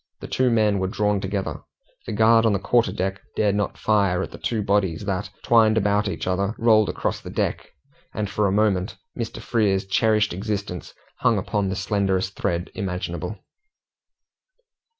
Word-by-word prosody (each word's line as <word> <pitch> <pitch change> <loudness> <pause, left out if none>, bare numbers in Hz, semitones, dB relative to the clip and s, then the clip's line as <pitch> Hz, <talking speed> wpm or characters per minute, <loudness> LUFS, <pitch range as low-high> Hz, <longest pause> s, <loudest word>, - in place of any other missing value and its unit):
The - - -8
two 130 -1 +1
men 105 -3 +2
were 95 - 0
drawn 105 0 0
together. 95 0 -3 0.5
The - - -3
guard 110 +2 +5
on 110 - +3
the - - +2
quarter 120 +4 +2
deck 95 +1 -3
dared 105 -2 +2
not 105 0 -1
fire 100 -4 +2
at - - -7
the - - -10
two 110 -3 -1
bodies 100 -2 0
that, 100 0 -2
twined 110 -2 +4
about 105 0 +2
each 100 - -3
other, 100 +3 0
rolled 110 -2 +4
across - - -2
the - - -8
deck, - - -2 0.4
and 105 -1 -2
for 100 +1 0
a - - 0
moment 100 -1 +1 0.2
Mr. 115 -1 -4
Frere's 105 -5 +1
cherished 105 +1 +2
existence 100 -2 -4 0.2
hung - - +3
upon 100 -2 -1
the 95 - -2
slenderest 95 -1 0
thread 85 +1 -2
imaginable. 90 0 -4
100 Hz, 170 wpm, -23 LUFS, 95-110 Hz, 0.5 s, guard